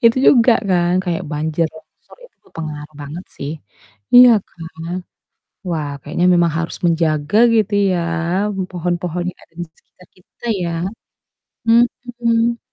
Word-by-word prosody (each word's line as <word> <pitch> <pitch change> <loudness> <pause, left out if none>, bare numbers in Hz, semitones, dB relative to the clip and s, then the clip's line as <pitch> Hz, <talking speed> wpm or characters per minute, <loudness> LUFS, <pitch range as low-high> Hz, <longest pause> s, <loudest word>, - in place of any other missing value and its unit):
itu 230 +1 +6
juga 245 -2 +6 0.2
kan 175 -1 +2
kayak 175 0 -2
banjir 155 +2 0
besar 160 - -18
itu - - -19
berpengaruh 155 -1 -8
banget 155 +6 -7
sih. 140 - -5 0.6
Iya 245 0 +10 0.2
kan, 165 -1 -10 1.0
wah 155 -4 -2
kayaknya 160 +4 -2
memang 170 -2 +3
harus 165 0 -3
menjaga 160 +1 +1 0.2
gitu 215 -2 +2 0.2
ya 180 - +1 0.7
pohon-pohon 175 0 -2
yang - - -24
ada - - -38
di - - -5
sekitar 180 - -22
kita 185 +5 -22 0.2
ya. 170 - -2 1.0
Mhm. 235 0 +2
175 Hz, 125 wpm, -18 LUFS, 160-225 Hz, 1.0 s, Iya